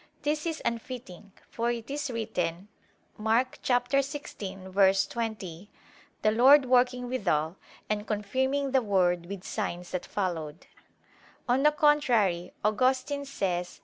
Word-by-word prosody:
This 300 +2 -1
is 325 -1 -3
unfitting; 230 -5 -5 0.2
for 235 +1 -2
it 235 +1 -4
is 290 0 -2
written 200 -6 -3 0.5
(Mk. 230 +4 +1
16:20): 205 - 0 0.6
"The 215 - +4
Lord 265 +5 +7
working 250 0 +2
withal, 175 -10 0 0.3
and 210 0 -2
confirming 265 +7 -1
the 265 -1 +4
word 180 -5 +1
with 195 -1 -7
signs 175 -1 -4
that 180 - -4
followed." 165 -5 -3 0.8
On 250 +2 +3
the 300 +1 +5
contrary, 240 - +2
Augustine 260 +6 +1
says 180 -9 -2
(Q. - - -22
225 Hz, 115 wpm, -28 LUFS, 190-260 Hz, 0.8 s, Lord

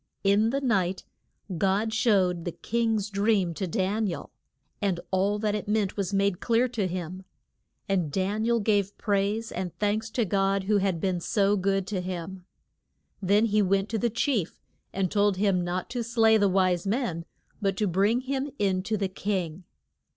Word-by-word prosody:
In 205 +3 +4
the 275 +3 -1
night 195 -8 0 0.6
God 200 +4 +1
showed 190 -7 +2
the 175 - -3
king's 225 0 -1
dream 200 -3 +1
to 190 +3 -3
Dan 205 +3 0
i - - -1
el, - - -8 0.5
and 190 -4 0
all 195 +2 +1
that 210 0 0
it 210 0 -3
meant 210 -2 0
was 195 -2 -2
made 200 -2 +1
clear 235 +2 +2
to 215 -6 -1
him. 180 +1 -5 0.6
And 180 -6 0
Dan 195 +6 -1
i - - 0
el 235 -1 +2
gave 205 -1 +1
praise 205 +2 0
and 180 -1 -5
thanks 215 +2 0
to 235 - +1
God 195 0 +1
who 205 +2 +2
had 190 -3 0
been 185 0 0
so 200 +3 +2
good 195 0 0
to 195 -3 -3
him. 180 0 -6 0.8
Then 205 +3 +3
he 215 -1 +2
went 195 +1 +1
to 225 - -1
the 235 - +1
chief, 235 - -1 0.3
and 190 -2 -1
told 205 -2 +2
him 195 -2 +2
not 175 +1 -2
to 245 -2 -2
slay 225 -1 +4
the 205 -2 +4
wise 185 -1 +1
men, 195 -7 -1 0.4
but 195 -2 0
to 210 - +1
bring 200 +6 +2
him 270 +2 -2
in 190 -2 +1
to 215 +3 -2
the 195 -1 0
king. 185 -3 -3
200 Hz, 185 wpm, -27 LUFS, 185-215 Hz, 0.8 s, In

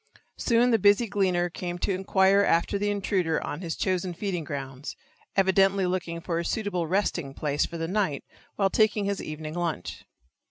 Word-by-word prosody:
Soon 240 0 +3
the 225 - +4
busy 205 +4 +5
gleaner 190 -4 +1
came 175 0 -5
to 195 +2 -1
inquire 190 +1 +3
after 185 +3 +2
the 205 +1 0
intruder 190 -5 0
on 150 - -5
his 165 -3 -3
chosen 185 -1 -1
feeding 180 -2 -3
grounds, 135 -1 -6 0.4
evidently 195 0 +3
looking 180 -2 -2
for 170 -1 -2
a - - -2
suitable 180 -3 -2
resting 175 -6 -1
place 145 -1 0
for 170 - -7
the 165 0 -2
night 185 -7 -1 0.3
while 195 -2 +1
taking 215 -2 +2
his 200 -1 -1
evening 155 0 -6
lunch. 170 - -3
185 Hz, 170 wpm, -27 LUFS, 165-200 Hz, 0.4 s, busy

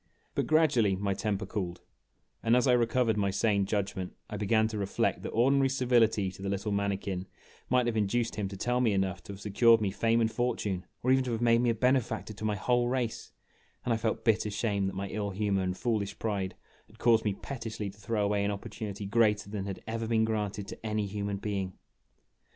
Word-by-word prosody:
But - - -1
gradually 140 -11 +4
my 100 +1 -1
temper 100 0 -2
cooled, 95 -4 -4 0.6
and 115 +1 +3
as 125 - +3
I 125 - +5
recovered 120 -2 +2
my 100 -1 +1
sane 100 0 +1
judgment 95 -3 -2 0.2
I - - -3
began 110 +2 +2
to 110 - -4
reflect 100 -1 0
that - - -4
ordinary 135 +3 +3
civility 120 -7 +2
to 95 - -12
the 100 - -3
little 100 +2 -2
mani 100 -1 0
kin 95 -1 -4 0.4
might 125 0 +3
have 120 -1 0
induced 115 +3 +1
him 105 -2 -2
to 95 0 -7
tell 125 +5 0
me 115 -4 +3
enough 95 -2 0
to 100 - -7
have 95 - -10
secured 115 +3 +5
me 100 -3 0
fame 115 +3 +2
and 110 -1 +2
fortune, 110 -6 -1 0.2
or 130 - +3
even 130 0 +4
to 125 - -2
have 115 - -2
made 115 0 +4
me 120 - +2
a 115 - +2
benefactor 125 -2 +1
to 110 - -10
my 105 -1 +1
whole 120 +4 +1
race; 125 -2 -2 0.5
and 120 - +2
I - - +1
felt 110 0 -2
bitter 110 -2 +3
shame 100 -2 0
that 95 - -4
my 100 +1 -3
ill 100 0 -3
humor 100 0 0
and 90 0 -2
foolish 110 -5 -1
pride 100 -4 -2 0.3
had - - -20
caused 115 -2 +4
me 105 -2 0
pettishly 110 -5 -5
to 100 - -21
throw 105 -1 0
away 100 0 +1
an 100 - +1
opportunity 105 -1 -5
greater 105 -1 +2
than 100 -2 -3
had 95 - -6
ever 115 0 -3
been 110 -1 +3
oranted 105 -2 -2
to - - -9
any 110 -1 -1
human 100 0 -3
beino 95 -2 -3
105 Hz, 220 wpm, -30 LUFS, 100-115 Hz, 0.6 s, I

